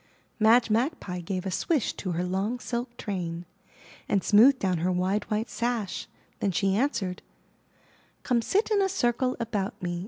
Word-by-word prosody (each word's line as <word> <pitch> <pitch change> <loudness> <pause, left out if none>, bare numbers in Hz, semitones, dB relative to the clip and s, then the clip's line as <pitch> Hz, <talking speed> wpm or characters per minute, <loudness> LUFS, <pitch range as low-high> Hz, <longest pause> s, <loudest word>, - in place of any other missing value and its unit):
*' - - -40
Madge 225 +1 +5
Magpie 220 - -1
gave 185 +2 -4
a 190 - -2
swish 285 - 0
to 185 -3 -4
her 170 +2 -1
long 195 +6 -1
silk 240 0 -4
train, 175 -4 -4 0.6
and 195 - +2
smoothed 240 +6 +6
down 185 -7 0
her 180 +3 +1
wide 185 +3 0
white 220 +1 -1
sash; 235 -5 -2 0.3
then 200 - 0
she 195 +2 +1
answered: 215 -7 -1 1.0
'*Come 240 -2 +2
sit 410 - +1
in 410 -2 +3
a 385 - +2
circle 255 -7 0
about 220 -2 -3
me. 175 -1 -3
210 Hz, 165 wpm, -27 LUFS, 185-240 Hz, 1.0 s, smoothed